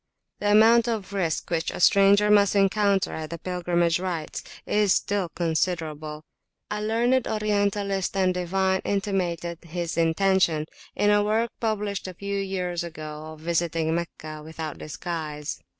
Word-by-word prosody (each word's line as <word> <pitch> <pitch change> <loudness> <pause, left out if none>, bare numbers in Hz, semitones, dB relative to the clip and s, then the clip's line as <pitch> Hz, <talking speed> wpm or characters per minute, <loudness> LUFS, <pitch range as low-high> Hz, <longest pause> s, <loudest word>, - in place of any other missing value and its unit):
The 205 - 0
amount 225 +3 +6
of 215 -4 -3
risk 175 -5 -1
which 165 -1 0
a - - -6
stranger 200 +3 +5
must 205 -1 +5
encounter 200 0 +2
at 155 -1 -5
the 170 - -5
pilgrimage 175 -1 0
rites 175 -4 -4 0.2
is 210 -2 +3
still 200 -4 0
considerable. 160 -3 -2 0.5
A 210 0 -2
learned 235 +4 +1
Orientalist 205 -2 0
and 185 -1 +3
divine 190 +1 0
intimated 180 -4 -1
his 170 0 -4
intention, 165 -1 +2 0.3
in 205 - +3
a 205 0 +4
work 220 +2 +1
[p.240] - - -43
published 210 -3 -1
but 185 - -4
a - - -42
few 200 0 -3
years 180 -3 -2
ago, 155 -2 -7
of 155 - -14
visiting 165 -1 0
Meccah 155 -2 -5
without 160 -1 -6
disguise. 155 -2 -5
185 Hz, 150 wpm, -25 LUFS, 165-205 Hz, 0.5 s, amount